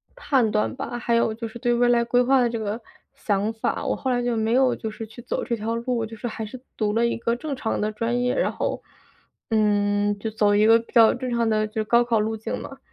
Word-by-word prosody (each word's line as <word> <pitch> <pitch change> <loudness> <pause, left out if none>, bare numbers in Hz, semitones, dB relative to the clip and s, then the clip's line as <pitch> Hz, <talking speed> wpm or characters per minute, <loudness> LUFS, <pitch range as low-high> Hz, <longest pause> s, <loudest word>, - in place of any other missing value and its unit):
判 260 -7 +1
断 110 - 0
吧， 240 - -5
还 235 -1 0
有 230 -1 +2
就 230 +1 -5
是 225 +2 -10
对 240 -2 +1
未 245 +1 +3
来 235 -1 +4
规 245 +1 +2
划 265 0 +4
的 240 - +2
这 230 - -3
个 215 +2 -3 0.3
想 205 +1 -1
法， 220 - -2
我 - - 0
后 265 - -3
来 245 -1 0
就 240 -1 0
没 220 +1 0
有 260 -1 +3
就 220 - -5
是 225 +1 -7
去 225 +3 -12
走 240 - -3
这 235 - -1
条 225 +1 -3
路， 235 0 -1
就 225 0 -10
是 240 - -4
还 220 0 -5
是 245 +4 -9 0.2
读 210 -2 0
了 230 +2 +2
一 235 - -1
个 235 0 -1
正 285 +2 -4
常 225 -3 -2
的 215 +1 0
专 230 +3 -1
业， 250 0 +1
然 - - +1
后， - - -3 0.7
嗯， 205 -1 +2
就 220 +2 -4
走 210 -1 +2
一 210 - +4
个 230 0 +7
比 230 - -13
较 225 -2 +7
正 255 +1 -4
常 235 -1 +1
的 215 0 +1
就 210 - -22
是 220 - 0
高 235 +2 +4
考 235 -2 +1
路 220 +1 -1
径 215 - -4
嘛。 270 - -9
230 Hz, 290 characters per minute, -24 LUFS, 215-240 Hz, 0.7 s, 个